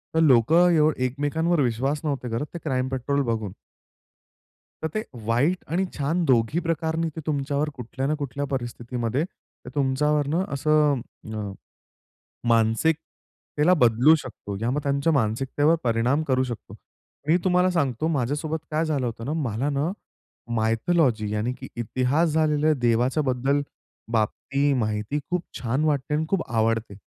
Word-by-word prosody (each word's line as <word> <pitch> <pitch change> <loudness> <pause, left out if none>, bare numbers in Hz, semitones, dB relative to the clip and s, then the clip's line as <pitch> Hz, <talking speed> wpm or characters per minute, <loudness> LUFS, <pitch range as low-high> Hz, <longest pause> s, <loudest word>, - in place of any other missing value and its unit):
तर - - +4
लोकं 160 +5 +5
येव 155 -2 +4
एकमेकांवर 145 +6 0
विश्वास 135 +4 0
नव्हते 140 -5 -2
करत, 115 +5 -2
ते 170 - -5
क्राईम 130 -4 0
पेट्रोल 135 +2 0
बघून. 110 -4 -2 1.3
तर 160 - 0
ते 215 - 0 0.2
वाईट 130 +10 +2 0.2
आणि 185 +3 +2
छान 160 +5 0
दोघी 125 +1 +2
प्रकारनी 165 -1 -1
ते - - -3
तुमच्यावर 145 0 0
कुठल्या 130 +2 -4
ना 150 - +1
कुठल्या 145 0 -3
परिस्थितीमध्ये 120 +1 -2
ते 175 - -16
तुमच्यावरून 145 +2 +1
असं 150 -4 +2 0.3
अ, 105 -2 -4 1.0
मानसिकतेला 150 +7 +1
बदलू 120 +7 +6
शकतो 100 -4 -7
या 115 - +1
मग 145 +3 0
त्यांच्या 140 +3 +1
मानसिकतेवर 135 +5 +2
परिणाम 120 +5 +2
करू 130 -1 +3
शकतो. 120 -3 -7 0.5
मी 165 - +5
तुम्हाला 180 0 +3
सांगतो 145 -5 0
माझ्यासोबत 150 +2 -1
काय 155 +1 +1
झालं 145 -5 0
होतं 115 -1 -5
ना, 145 - -2
मला 135 -3 -1
ना 145 +4 0 0.6
मायथोलॉजी 115 0 +1
यानि, 105 +3 -1
की 130 +1 -9
इतिहास 130 +7 +1
झालेल्या 155 0 +2
देवाच्या 125 +3 +1
बद्दल 135 +1 +1 0.5
बाबती 135 +6 +1
माहिती 110 +2 -1
खूप 180 -1 0 0.2
छान 130 +4 0
वाटते 150 -1 0
आणि 155 +1 +1
खूप 190 -2 +1
आवडते. 115 -2 0
140 Hz, 140 wpm, -25 LUFS, 120-155 Hz, 1.3 s, बदलू